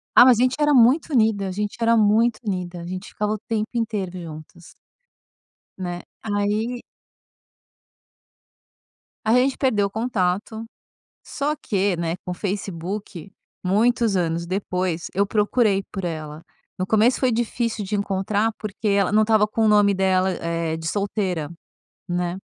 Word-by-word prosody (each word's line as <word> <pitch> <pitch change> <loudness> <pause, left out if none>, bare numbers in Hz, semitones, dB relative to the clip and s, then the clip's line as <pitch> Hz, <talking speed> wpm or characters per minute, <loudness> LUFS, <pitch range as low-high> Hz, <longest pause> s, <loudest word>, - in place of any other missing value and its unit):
Ah, 245 - +9
mas 250 -3 +6
a - - +3
gente 255 0 +2
era 295 0 +4
muito 260 +6 +4
unida. 220 -4 +2
A - - -3
gente 210 +2 -3
era 230 0 +4
muito 220 +2 +3
unida. 180 -4 -3
A - - -8
gente 185 +2 -6
ficava 210 0 -2
o 215 - -2
tempo 220 0 -3
inteiro 210 -6 -2
juntas. 160 +1 -11 1.0
Né. 175 -2 -5 0.2
Aí 215 +3 -1 2.4
Aí, 220 +2 +4
a - - +6
gente 270 0 -1
perdeu 215 -7 +2
o - - -6
contato. 220 -1 -1 0.6
Só 290 +2 -2
que, 200 -7 0
né, 165 0 -2
com 180 - -4
Facebook, 195 -1 -5 0.3
muitos 225 +3 +2
anos 170 -1 -1
depois, 180 -2 -2
eu 200 +2 +2
procurei 210 -1 +2
por 195 -2 -5
ela. 155 -2 -5 0.4
No 185 - -1
começo 220 +5 +3
foi 255 -2 +2
difícil 230 -2 -1
de 210 - -4
encontrar, 200 +2 0
porque 215 0 -4
ela 200 -1 +2
não 215 +1 +5
estava 215 -1 +3
com 220 +1 0
o - - +4
nome 205 -1 +5
dela, 190 0 +2
eh, 165 -1 -2
de 160 0 -7
solteira, 190 -5 -2 0.6
né. 175 0 -1
205 Hz, 150 wpm, -23 LUFS, 180-225 Hz, 2.4 s, Ah